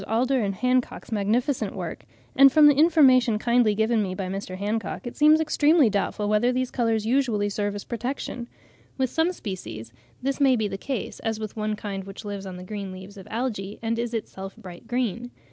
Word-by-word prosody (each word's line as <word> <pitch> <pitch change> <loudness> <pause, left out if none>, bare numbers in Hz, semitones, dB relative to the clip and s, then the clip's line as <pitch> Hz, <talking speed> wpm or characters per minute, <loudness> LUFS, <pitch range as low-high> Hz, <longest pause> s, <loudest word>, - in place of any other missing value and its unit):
Alder 250 +4 +1
and 200 -2 -1
Hancock's 250 +2 -1
magnificent 225 +6 0
work; - - -6 0.3
and 275 0 +8
from 295 +1 +7
information 270 -7 +5
kindly 235 -1 +2
given 220 +1 +2
me 185 -2 -2
by 190 - -3
Mr. 190 -1 -5
Hancock, 210 +5 -3
it 240 - -6
seems 305 +1 +5
extremely 305 -4 +3
doubtful 205 +1 -1
whether 215 +4 +3
these 255 0 -1
colours 225 -3 0
usually 230 -5 +1
serve 205 0 -2
as 205 - -6
a - - -28
protection. 245 0 -4 0.5
With 260 -2 0
some 325 +2 +2
species 115 - -7 0.3
this 275 +2 -2
may 270 -2 +5
be 220 -3 0
the 200 - -5
case, 260 -3 -4
as 225 -1 -2
with 215 -2 -6
one 215 -1 -2
kind 200 -2 -5
which 195 +1 -9
lives 200 -1 -5
on 185 -1 -7
the 180 - -8
green 200 0 -6
leaves 190 +2 -10
of 195 -2 -11
algae, 215 -4 -3
and 230 0 -1
is 235 0 -2
itself 195 -3 -6
bright 185 -1 -11
green. 245 -1 -2
225 Hz, 195 wpm, -25 LUFS, 200-255 Hz, 0.5 s, and